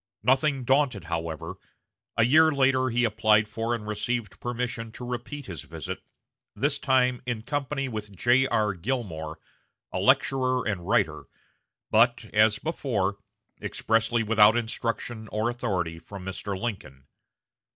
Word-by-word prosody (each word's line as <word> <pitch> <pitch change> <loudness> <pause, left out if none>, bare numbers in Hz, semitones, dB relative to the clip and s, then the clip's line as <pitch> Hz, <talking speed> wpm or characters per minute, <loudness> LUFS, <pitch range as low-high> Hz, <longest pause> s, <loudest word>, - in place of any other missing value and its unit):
Nothing 135 +2 +2
daunted, 130 -4 +2
however, 80 -2 -4 0.6
a 115 - +5
year 160 +5 +6
later 130 -2 +3
he 120 +1 +1
applied 110 -1 +3
for 115 +2 -2
and 105 -2 -7
received 105 0 -3
permission 120 -2 -3
to 125 - -7
repeat 125 +4 -5
his 85 -6 -7
visit, - - -7 0.5
this 145 +1 +1
time 125 -3 +2
in 115 -3 -2
company 140 +1 -2
with 105 -5 -6
J.R. 120 -3 +3
Gilmore, 85 -7 -4 0.5
a - - -2
lecturer 130 -2 +2
and 90 -5 -3
writer, - - +1 0.7
but, 120 +1 +4
as 110 0 +5
before, 110 - -1 0.4
expressly 115 +1 +1
without 110 +1 +5
instruction 115 -1 -3
or 110 +3 -1
authority 90 -9 -2
from 95 +2 -10
Mr. 95 +1 -4
Lincoln. 90 - -5
115 Hz, 130 wpm, -27 LUFS, 105-125 Hz, 0.7 s, year